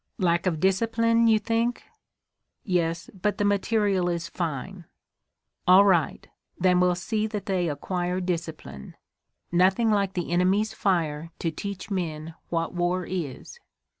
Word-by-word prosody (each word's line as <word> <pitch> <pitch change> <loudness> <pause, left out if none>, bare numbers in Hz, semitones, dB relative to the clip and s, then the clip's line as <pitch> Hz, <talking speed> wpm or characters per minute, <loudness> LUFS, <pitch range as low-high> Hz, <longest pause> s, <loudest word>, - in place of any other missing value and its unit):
"Lack 175 -2 +1
of 165 -4 0
discipline, 230 +5 +2
you 220 -1 +5
think?" 230 +3 -1 0.8
"Yes, 170 -3 -1
but 205 +2 -1
the 205 - +1
material 205 -2 +1
is 170 -1 -3
fine." 170 +3 -4 0.8
"All 185 +2 +8
right. 175 -6 +1 0.3
Then 180 0 +3
we'll 180 0 +3
see 215 +4 -1
that 210 -3 -5
they 180 -4 0
acquire 180 +4 -2
discipline. 160 - -5 0.6
Nothing 190 +6 +3
like 200 -2 +1
the 175 -2 -3
enemy's 190 +5 +2
fire 165 -5 -1
to 165 - -2
teach 200 +4 -6
men 165 -4 -3 0.2
what 165 0 -1
war 175 +1 0
is." 180 - -6
185 Hz, 135 wpm, -26 LUFS, 170-205 Hz, 0.8 s, All